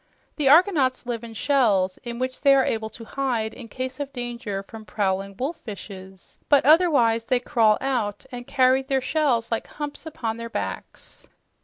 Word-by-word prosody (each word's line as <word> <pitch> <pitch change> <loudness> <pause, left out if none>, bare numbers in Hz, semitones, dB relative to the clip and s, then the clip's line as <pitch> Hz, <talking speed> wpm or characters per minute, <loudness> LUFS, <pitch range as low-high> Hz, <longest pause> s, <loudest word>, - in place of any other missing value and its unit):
The 290 -3 +2
argonauts 290 -6 +4
live 240 -2 -4
in 230 -1 -9
shells 205 -9 +2
in 235 -1 -5
which 255 +1 -3
they 275 -1 +6
are 270 - +3
able 220 -1 -2
to 230 +1 -11
hide 235 -4 -2
in 240 - -10
case 255 +4 -5
of 285 -1 -4
danger 240 -6 -5
from 220 +2 -11
prowling 195 -2 -2
wolf 295 +6 -3
fishes, 190 -3 -11
but 285 -3 +5
otherwise 280 -8 +4
they 250 0 +2
crawl 225 -4 +3
out 240 -5 -2
and 245 -1 -8
carry 260 -1 +3
their 270 0 0
shells 255 -4 0
like 230 - -2
humps 295 +2 -7
upon 230 -7 -4
their 230 0 -6
backs. - - -6
245 Hz, 175 wpm, -24 LUFS, 220-275 Hz, -, they